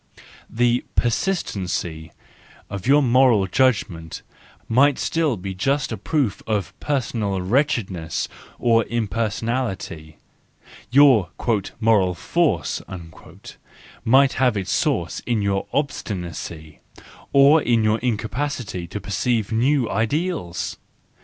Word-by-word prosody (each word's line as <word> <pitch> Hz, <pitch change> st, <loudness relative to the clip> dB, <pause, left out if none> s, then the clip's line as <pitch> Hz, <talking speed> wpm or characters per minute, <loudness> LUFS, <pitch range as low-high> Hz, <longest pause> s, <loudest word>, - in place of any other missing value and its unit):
The 120 Hz, +1 st, +1 dB
persistency 95 Hz, -, -1 dB, 0.6 s
of 100 Hz, 0 st, -5 dB
your 145 Hz, +2 st, +5 dB
moral 125 Hz, -5 st, +4 dB
judgment 95 Hz, -7 st, 0 dB, 0.4 s
might 135 Hz, +4 st, +4 dB
still 155 Hz, -8 st, 0 dB
be 95 Hz, +1 st, -5 dB
just 135 Hz, +10 st, 0 dB
a -, -, -1 dB
proof 125 Hz, 0 st, -1 dB
of 105 Hz, -3 st, -1 dB
personal 115 Hz, -8 st, -1 dB
wretchedness 95 Hz, -, -1 dB, 0.3 s
or 115 Hz, -1 st, +3 dB
impersonality; 110 Hz, -6 st, -3 dB, 0.7 s
your 130 Hz, -, +5 dB, 0.5 s
"moral 105 Hz, -5 st, +3 dB
force" 95 Hz, -, 0 dB, 1.2 s
might 135 Hz, +3 st, +5 dB
have 125 Hz, -5 st, +2 dB
its 95 Hz, -1 st, -3 dB
source -, -, 0 dB
in 115 Hz, -4 st, +1 dB
your 100 Hz, -1 st, -1 dB
obstinacy—or 100 Hz, -, -1 dB
in 115 Hz, -4 st, +2 dB
your 110 Hz, +1 st, +2 dB
incapacity 115 Hz, -4 st, -3 dB
to 105 Hz, -, -5 dB
perceive 105 Hz, +3 st, -1 dB
new 125 Hz, +3 st, +2 dB
ideals! 110 Hz, -, -2 dB
115 Hz, 95 wpm, -22 LUFS, 95-130 Hz, 1.2 s, your